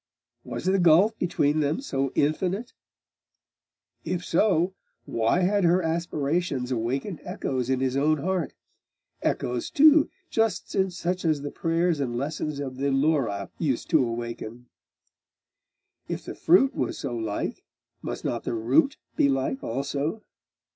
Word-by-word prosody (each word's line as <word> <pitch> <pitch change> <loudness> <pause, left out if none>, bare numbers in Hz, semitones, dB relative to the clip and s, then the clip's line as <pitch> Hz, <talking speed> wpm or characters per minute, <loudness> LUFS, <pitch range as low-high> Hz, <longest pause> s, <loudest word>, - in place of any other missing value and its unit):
Was - - -6
the 190 +1 +3
gulf 180 +6 +5
between 155 -3 +1
them 150 +1 0
so 135 - -2
infinite? 185 +10 0 1.3
If 180 -1 -3
so, 180 0 +2 0.3
why 115 +10 +1
had 200 +2 +2
her 175 +2 +4
aspirations 160 -4 -1
awakened 130 - -2
echoes 130 -2 -3
in 130 -1 +1
his 130 -1 0
own 150 +3 +3
heart 175 0 -2 0.7
echoes 125 -1 -1
too, 305 +1 +6 0.2
just 225 -4 0
such 180 -1 -1
as 155 -4 +1
the 145 - -4
prayers 165 -1 0
and 120 -4 -2
lessons 150 +2 -3
of 130 -2 -5
the 140 +1 0
Laura 135 -8 +1
used 140 -2 -1
to 155 -5 +5
awaken? 120 0 -5 1.4
If - - -5
the - - -5
fruit 190 +11 +4
was 125 - -2
so 120 - -4
like, 110 -3 -3 0.4
must - - -5
not 115 - -2
the - - -2
root 125 - +2 0.2
be 140 - +3
like 135 0 -1
also?.... 140 - -2
150 Hz, 135 wpm, -26 LUFS, 130-180 Hz, 1.4 s, too